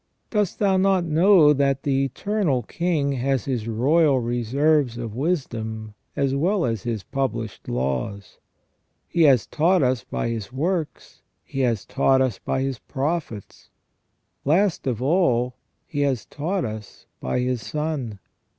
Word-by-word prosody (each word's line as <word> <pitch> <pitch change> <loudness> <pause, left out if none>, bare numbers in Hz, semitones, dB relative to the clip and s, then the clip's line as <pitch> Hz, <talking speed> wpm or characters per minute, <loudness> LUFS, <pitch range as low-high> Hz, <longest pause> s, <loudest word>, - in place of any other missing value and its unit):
Dost 210 -4 0
thou 195 -2 +2
not 190 -1 +3
know 165 -1 +5
that 140 -1 +1
the 135 -1 +1
Eternal 155 - -1
King 160 +1 -1
has 135 -1 0
His 120 -5 -2
royal 140 +5 +3
reserves 120 +3 +1
of 115 -3 -5
wisdom, 115 -8 -3 0.2
as 135 -1 +1
well 175 +6 +1
as 115 -4 -1
His 115 -3 -3
published 130 -6 -3
laws? 65 - -3 0.7
He 170 - 0
has 125 -5 +4
taught 170 +1 +2
us 125 -1 +1
by - - -3
His 115 0 -4
works. 155 +1 -3 0.2
He 135 - -6
has 120 -6 +1
taught 135 -1 +2
us 130 -7 0
by 130 - -2
His 135 -4 -3
prophets, 140 - -4 0.7
last 170 +1 +2
of 125 -1 -1
all 130 -6 +2 0.3
He 145 - -5
has 135 -5 0
taught 175 +5 -2
us 110 -2 -8
by 65 - -2
His 125 -1 -1
Son. 150 -8 -3
135 Hz, 140 wpm, -23 LUFS, 115-160 Hz, 0.7 s, know